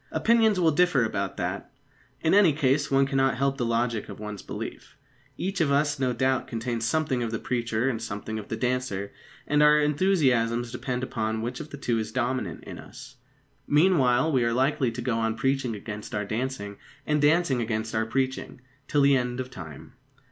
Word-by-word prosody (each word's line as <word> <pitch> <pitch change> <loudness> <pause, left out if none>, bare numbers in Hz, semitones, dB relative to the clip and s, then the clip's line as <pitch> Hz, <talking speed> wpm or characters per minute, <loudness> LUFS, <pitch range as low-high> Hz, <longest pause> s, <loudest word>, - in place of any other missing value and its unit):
Opinions 225 -4 +3
will 165 -3 +4
differ 155 -6 +3
about 100 -3 -3
that. - - -4 0.5
In 160 - +2
any 195 -6 +6
case, 145 0 +1
one 135 0 +4
cannot 135 -1 +1
help 135 +1 0
the - - +1
logic 115 -1 -1
of - - -9
one's 105 -1 -6
belief. - - -8 0.4
Each 195 0 -2
of 145 -3 +2
us, 145 +1 +1
no 130 -2 +1
doubt, 130 +2 0
contains 115 0 -3
something 145 -1 0
of 115 - -1
the 115 - -2
preacher 120 0 -1
and 120 -4 -1
something 110 0 -5
of 105 - -9
the - - -3
dancer; 125 -6 -2 0.3
and 150 0 +2
our 150 0 +6
enthusiasms 135 -8 +2
depend 125 +1 -3
upon 110 -3 -2
which 125 +2 -4
of 150 - -7
the 140 - -8
two 120 -4 0
is 110 - -4
dominant 125 - -2
in - - -9
us. 125 +1 -12 0.5
Meanwhile, 150 -3 +3
we 130 -4 +2
are 115 0 +1
likely 130 0 +1
to 120 +1 -6
go 120 -2 0
on 110 0 0
preaching 135 -2 0
against 105 +2 -7
our 105 0 -1
dancing, 110 -2 -4 0.3
and 150 -1 +1
dancing 150 -4 +3
against 110 -1 -2
our 110 0 0
preaching, 130 +1 -2 0.3
till 145 - +2
the 140 0 +5
end 125 -1 -1
of 130 0 -5
time. 80 - -10
125 Hz, 190 wpm, -26 LUFS, 115-140 Hz, 0.5 s, any